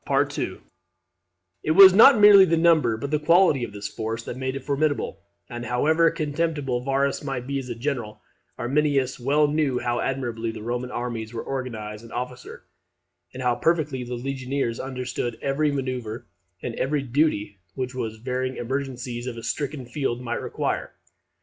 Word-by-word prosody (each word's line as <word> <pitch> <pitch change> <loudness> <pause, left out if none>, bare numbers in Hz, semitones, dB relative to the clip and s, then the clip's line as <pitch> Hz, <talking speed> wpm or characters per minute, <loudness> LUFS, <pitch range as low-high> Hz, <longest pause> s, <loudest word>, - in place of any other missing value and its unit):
It 155 - 0
was 190 -1 +10
not 225 +4 +8
merely 205 -1 +9
the 165 -2 +1
number, 160 -9 +4
but 140 +5 -5
the 150 - +2
quality 165 -3 +4
of 115 - -4
this 100 0 -5
force 115 +2 -4
that - - -6
made 130 +1 -3
it 135 - -6
formidable; 145 +1 -1 0.3
and 120 0 -6
however 155 +8 +3
contemptible 150 -5 -2
Varus 135 +2 0
might 135 -3 -4
be 140 +1 -2
as 130 -2 -7
a 120 - -4
general, 115 -4 -3 0.4
Arminius 135 +1 0
well 145 +4 +3
knew 145 -3 +1
how 120 0 -1
admirably 120 -4 -2
the 110 - -7
Roman 125 +2 -3
armies 120 -2 -4
were 115 - -3
organized 110 -6 -5
and 115 - -13
officered, 125 0 -6 0.7
and 130 - -7
how 125 -1 +3
perfectly 150 -1 0
the 125 0 -5
legionaries 130 -1 -3
understood 125 -3 -4
every 145 +2 0
manoeuvre 130 -5 -4 0.4
and 120 - -3
every 140 +1 0
duty 120 -7 0 0.2
which 130 -1 -3
the 110 -3 -4
varying 130 0 -2
emergencies 125 -1 -4
of 120 -2 -5
a 115 - -8
stricken 140 +2 -3
field 120 -1 -2
might 120 -1 -3
require. - - -3
130 Hz, 160 wpm, -24 LUFS, 120-145 Hz, 0.7 s, was